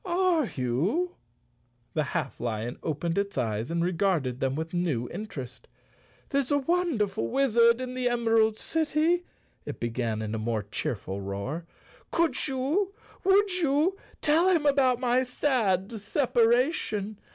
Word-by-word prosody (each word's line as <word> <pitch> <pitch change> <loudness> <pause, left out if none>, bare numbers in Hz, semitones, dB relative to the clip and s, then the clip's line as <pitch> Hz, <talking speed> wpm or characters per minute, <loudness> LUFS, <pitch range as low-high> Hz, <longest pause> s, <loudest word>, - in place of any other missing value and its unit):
"Are 350 - +2
you?" 165 - 0 0.8
The 155 - +1 0.2
half - - -4
lion 115 +1 -3
opened 165 +3 -1
its 200 -4 -3
eyes 110 -2 -1
and 170 0 0
re¬ 180 0 0
garded 165 -10 0
them 135 0 0
with 160 +2 -4
new 160 -9 0
interest. 145 - -7 0.6
"There's 275 -3 0
a 285 - +4
wonder¬ 325 - +1
ful 115 - -3
wizard 235 -3 +4
in 255 -1 -4
the 255 -1 0
Emerald 225 -2 +2
City," 320 +4 +1 0.4
it - - -7
began 115 -2 -2
in 110 0 -4
a 110 - -2
more 110 -1 -1
cheerful 100 -1 -4
roar. 100 - -4 0.2
" - - -27
Could 335 -2 +1
you, 300 +10 0 0.3
would 390 +1 +4
you, 310 +4 +2 0.3
tell 325 +5 +4
him 335 -5 +2
about 270 -4 +3
my 250 0 +2
sad 225 -6 0
separation? 230 - +1
220 Hz, 145 wpm, -28 LUFS, -, 0.8 s, a